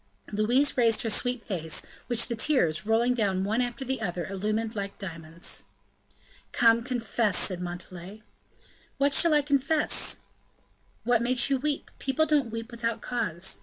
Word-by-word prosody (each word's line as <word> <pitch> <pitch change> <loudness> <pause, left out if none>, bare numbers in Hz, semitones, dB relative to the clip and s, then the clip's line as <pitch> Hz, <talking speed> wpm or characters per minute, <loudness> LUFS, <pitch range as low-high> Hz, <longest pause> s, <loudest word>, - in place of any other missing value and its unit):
Louise 240 +8 +2
raised 230 -3 +4
her 225 - 0
sweet 245 +1 0
face, 160 -5 -2 0.2
which 240 -2 +1
the 235 - -2
tears, 220 - +2
rolling 235 +3 +3
down 195 -6 0
one 220 +5 +1
after 245 +2 -3
the 260 -2 -2
other, 175 -4 -2
illumined 215 +4 -2
like 200 -1 -4
diamonds. 165 -3 -7 0.9
"Come, 230 -1 +4
confess," 230 -4 0
said 185 -3 -1
Montalais. 180 +3 -6 0.7
"What 280 +1 +2
shall 325 +2 +5
I 295 - +4
confess?" 290 +2 +1 0.8
"What 240 0 +3
makes 245 +2 0
you 270 - +2
weep; 290 +1 -2
people 270 +4 +1
don't 295 -6 +2
weep 230 +2 -6
without 230 -1 -2
cause. 190 -6 -1
230 Hz, 150 wpm, -28 LUFS, 195-250 Hz, 0.9 s, shall